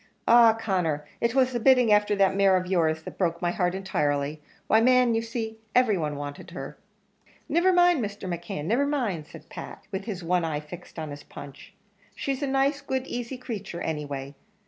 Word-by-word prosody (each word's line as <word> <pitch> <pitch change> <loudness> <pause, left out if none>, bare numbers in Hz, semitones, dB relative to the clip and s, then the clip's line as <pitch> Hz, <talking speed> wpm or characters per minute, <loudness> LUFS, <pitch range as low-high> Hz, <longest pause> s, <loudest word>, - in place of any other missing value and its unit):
Ah! 230 -1 +7
Conner, 175 -9 -1 0.2
it 235 +1 +1
was 260 -1 +3
the 240 - 0
bidding 250 -2 +5
afther 210 0 +3
that 195 -1 +3
mare 195 -1 +4
of 185 - -2
your's 160 -4 +1
that - - -10
broke 170 -3 0
my 175 -1 0
heart 180 0 0
entirely 150 -5 -1 0.2
why, 220 - +4
man, 250 0 +4
you 225 - +1
see, 225 -1 -5 0.2
every 250 -4 +4
one 150 -4 -2
wanted 145 0 -7
her." - - -7 0.7
"Niver 350 +3 +3
mind, 355 -6 +4
Mr. 205 -2 -5
McKeon, 175 -2 -4
niver 245 - +2
mind!" 220 - -2
said - - -13
Pat, - - -9
with 195 0 -4
his 195 -6 -5
one 175 +1 +1
eye 155 -2 -1
fixed 170 +5 -11
on 155 -2 -5
his 145 0 -8
punch. 140 +1 -12 0.4
"She's 275 0 -3
a 285 - 0
nice, 275 +2 +1
good, 265 -2 -2
easy 245 0 -5
creature, 205 -8 -6
anyway. 145 -3 -4
195 Hz, 190 wpm, -26 LUFS, 165-245 Hz, 0.7 s, Ah